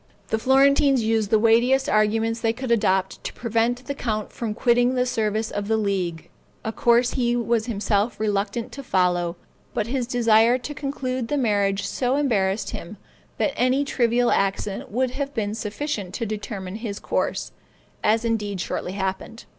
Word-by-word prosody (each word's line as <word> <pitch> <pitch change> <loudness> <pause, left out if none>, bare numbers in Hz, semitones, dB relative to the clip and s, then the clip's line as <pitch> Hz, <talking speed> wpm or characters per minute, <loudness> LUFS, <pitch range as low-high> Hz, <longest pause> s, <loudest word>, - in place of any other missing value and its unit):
The 220 - 0
Florentines 275 0 +4
used 220 -2 +1
the 220 - +5
weightiest 235 +5 +3
arguments 225 +2 +1
they 225 -1 +1
could 255 +1 -4
adopt 190 -4 +1
to - - -4
prevent 235 +2 -1
the 280 - -3
count 215 -6 -3
from 220 -3 -4
quitting 245 +2 +3
the 250 0 +2
service 220 -2 -1
of 205 0 -3
the 220 0 +2
League, 185 -6 -2 0.3
a 220 - -1
course 240 +2 +3
he 240 -2 +1
was 235 -1 0
himself 210 0 0
reluctant 210 +1 -1
to 275 - -7
follow, 180 -6 +1 0.4
but - - 0
his 245 +1 -2
desire 235 -1 +4
to 260 +4 -6
conclude 260 -4 -3
the 295 - -1
marriage 200 -5 +1
so 255 0 0
embarrassed 215 -8 0
him, 175 +5 -7 0.4
that 285 - 0
any 255 +3 +2
trivial 240 -3 +2
accident 195 0 -1
would 250 +4 0
have 280 +1 -4
been 210 -2 -1
sufficient 210 -3 -4
to 230 - -2
determine 205 -2 -5
his 220 -3 -5
course, - - -2 0.5
as 225 +2 +2
indeed 210 -4 -1
shortly 180 +1 -3
happened. 195 +3 -4
225 Hz, 165 wpm, -24 LUFS, 205-250 Hz, 0.5 s, the